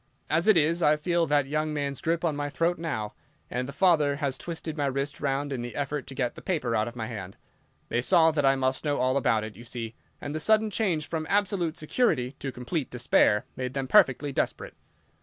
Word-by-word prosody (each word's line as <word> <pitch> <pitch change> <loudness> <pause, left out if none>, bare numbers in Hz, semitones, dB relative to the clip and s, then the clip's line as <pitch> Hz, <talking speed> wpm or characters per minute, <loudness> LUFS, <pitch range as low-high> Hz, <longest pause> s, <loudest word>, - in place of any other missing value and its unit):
As 165 +5 +2
it 215 -5 +6
is, 165 +3 +2
I 150 -1 +5
feel 170 +2 0
that 145 -1 +3
young 155 +2 -1
man's 140 -2 -3
grip 165 +1 0
on 155 -3 0
my 145 0 -2
throat 165 +4 0
now, 110 -11 -3 0.4
and 125 +1 -2
the - - -6
father 155 -5 +3
has 140 -2 -1
twisted 160 +1 -5
my 145 -2 0
wrist 140 +2 -3
round 140 0 -1
in 125 - -3
the 120 0 -6
effort 145 0 -3
to 135 - -8
get 125 -3 -1
the - - -11
paper 150 -11 -1
out 110 0 +1
of 120 - -7
my 115 -2 -4
hand. 100 -5 -7 0.5
They 120 - +1
saw 160 +3 +5
that 150 -2 0
I 135 0 +5
must 130 0 0
know 145 -1 0
all 130 +1 +1
about 115 -5 +2
it, 110 -1 -7
you 120 - -11
see, 115 -1 -6 0.3
and 145 - -5
the 155 - -2
sudden 220 +5 +3
change 180 -9 0
from 160 -1 -3
absolute 195 -5 +1
security 150 - +1
to 135 - -4
complete 130 +4 -3
despair 110 -3 +2
made 130 0 -4
them 135 -1 -2
perfectly 135 +2 +4
desperate. - - -2
145 Hz, 225 wpm, -27 LUFS, 130-160 Hz, 0.5 s, it